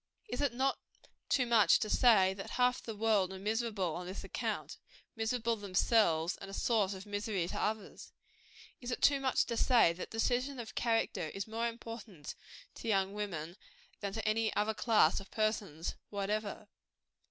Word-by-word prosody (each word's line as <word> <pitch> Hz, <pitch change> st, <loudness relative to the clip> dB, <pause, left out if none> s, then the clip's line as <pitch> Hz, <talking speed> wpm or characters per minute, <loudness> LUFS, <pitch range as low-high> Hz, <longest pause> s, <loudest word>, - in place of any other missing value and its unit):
Is 245 Hz, -, -2 dB
it 280 Hz, -4 st, +1 dB, 0.8 s
too 255 Hz, -, +3 dB
much 230 Hz, -3 st, +5 dB
to 225 Hz, -, -2 dB
say, 210 Hz, -5 st, +5 dB
that 195 Hz, 0 st, -7 dB
half 250 Hz, 0 st, +3 dB
the 225 Hz, -, -6 dB
world 205 Hz, -3 st, +2 dB
are 190 Hz, -, -6 dB
miserable 210 Hz, -3 st, -1 dB
on 175 Hz, +2 st, -5 dB
this 185 Hz, -, -6 dB
account, -, -, -4 dB, 0.4 s
miserable 230 Hz, +1 st, 0 dB
themselves, 185 Hz, -4 st, +2 dB
and 195 Hz, -, -9 dB
a 195 Hz, -, -6 dB
source 205 Hz, -5 st, +1 dB
of 190 Hz, +2 st, -9 dB
misery 205 Hz, -3 st, -2 dB
to -, -, -4 dB
others? 215 Hz, -1 st, -3 dB, 0.7 s
Is 245 Hz, -, -6 dB
it 245 Hz, -, -3 dB
too 280 Hz, -1 st, +5 dB
much 265 Hz, -1 st, +2 dB
to 235 Hz, -, -3 dB
say, 230 Hz, -8 st, +4 dB
that 175 Hz, -, -7 dB
decision 250 Hz, +4 st, 0 dB
of 230 Hz, -2 st, -7 dB
character 225 Hz, -8 st, 0 dB
is 195 Hz, -, -3 dB
more 225 Hz, +2 st, -1 dB
important 225 Hz, -8 st, -8 dB, 0.4 s
to -, -, -7 dB
young 195 Hz, -2 st, +1 dB
women 180 Hz, -5 st, -4 dB, 0.4 s
than 200 Hz, -1 st, -3 dB
to 220 Hz, 0 st, -3 dB
any 220 Hz, 0 st, +2 dB
other 215 Hz, +1 st, +1 dB
class 215 Hz, -7 st, +3 dB
of 195 Hz, -, -11 dB
persons 205 Hz, -7 st, -1 dB, 0.2 s
whatever? 205 Hz, +1 st, -3 dB
215 Hz, 165 wpm, -33 LUFS, 195-230 Hz, 0.8 s, much